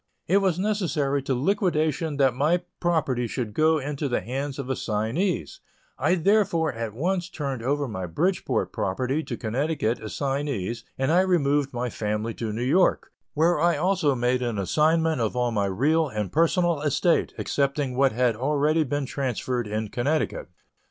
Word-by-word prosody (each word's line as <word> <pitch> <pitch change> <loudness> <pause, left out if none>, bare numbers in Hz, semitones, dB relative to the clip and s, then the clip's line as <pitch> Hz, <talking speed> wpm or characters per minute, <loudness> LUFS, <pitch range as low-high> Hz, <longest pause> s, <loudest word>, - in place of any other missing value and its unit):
It 190 - +3
was 190 -4 +1
necessary 165 -9 0
to 135 0 -1
liquidation 160 - 0
that 135 -3 +3
my 155 +7 +1 0.2
property 140 -8 0
should 115 -3 -4
go 155 +5 +3
into 145 0 -3
the 120 - 0
hands 135 +3 -4
of 140 -3 -5
assignees; 130 - -1 0.4
I 180 - +3
therefore 170 -4 +2
at 115 -2 -5
once 175 +6 -1
turned 135 -5 -4
over 140 +3 0
my 95 -6 -4
Bridgeport 180 - -1
property 130 +10 -1
to 120 -6 -5
Connecticut 130 +1 -1
assignees 135 -2 -3
and 135 +3 +1
I 175 +2 +5
removed 145 -6 +2
my 125 -1 -3
family 105 +2 -2
to 110 -1 -4
New 115 +3 -3
York, 170 +9 +2 0.2
where 160 +2 +3
I 170 +2 +3
also 175 -7 +2
made 125 +1 +1
an 120 -3 -2
assignment 155 - +2
of 110 +1 -1
all 125 -1 +1
my 105 -3 0
real 150 +11 +2
and 105 -4 -3
personal 170 -1 +2
estate, 155 +3 +1
excepting 140 -2 -1
what 135 0 +3
had 120 0 +1
already 150 +5 +1
been 145 0 -2
transferred 125 -3 -2
in 105 +1 -3
Connecticut. 155 - -1
140 Hz, 160 wpm, -25 LUFS, 120-160 Hz, 0.4 s, I